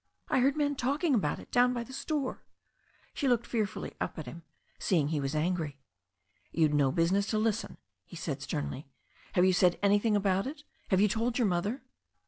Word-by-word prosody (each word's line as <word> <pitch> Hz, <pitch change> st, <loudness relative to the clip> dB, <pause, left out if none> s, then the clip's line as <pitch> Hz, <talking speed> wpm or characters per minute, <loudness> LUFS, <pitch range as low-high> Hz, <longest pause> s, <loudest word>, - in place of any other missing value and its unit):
"I -, -, +3 dB
heard 270 Hz, +3 st, +3 dB
the -, -, -9 dB
men 290 Hz, -1 st, +1 dB
talking 285 Hz, +4 st, 0 dB
about 185 Hz, -, +1 dB
it -, -, -13 dB
down 250 Hz, 0 st, +4 dB
by 240 Hz, -, -2 dB
the 260 Hz, -, -12 dB
store.'* 275 Hz, 0 st, -3 dB, 0.7 s
She 280 Hz, -, -1 dB
looked 240 Hz, -2 st, +2 dB
fearfully 215 Hz, -5 st, -2 dB
at 155 Hz, -, -3 dB
him, 170 Hz, -, -9 dB, 0.4 s
seeing 155 Hz, -6 st, +1 dB
he 155 Hz, -2 st, 0 dB
was 135 Hz, +2 st, -2 dB
angry. 155 Hz, -3 st, -1 dB, 0.7 s
"You'd 155 Hz, -3 st, +2 dB
no 140 Hz, -2 st, +3 dB
business 185 Hz, +6 st, +2 dB
to 215 Hz, -, 0 dB
listen," 220 Hz, +1 st, -1 dB, 0.3 s
he -, -, -13 dB
said 145 Hz, -4 st, -4 dB
sternly. 145 Hz, -1 st, -4 dB, 0.5 s
"Have 180 Hz, -, +4 dB
you 185 Hz, -, +4 dB
said 180 Hz, -1 st, +4 dB
anything 205 Hz, +2 st, +3 dB
about 195 Hz, +1 st, +1 dB
it? 290 Hz, +1 st, -7 dB, 0.2 s
Have 190 Hz, -1 st, +3 dB
you 210 Hz, -, +6 dB
told 230 Hz, +4 st, 0 dB
your 240 Hz, -4 st, +3 dB
mother?" 200 Hz, +9 st, -1 dB
200 Hz, 190 wpm, -30 LUFS, 165-245 Hz, 0.7 s, you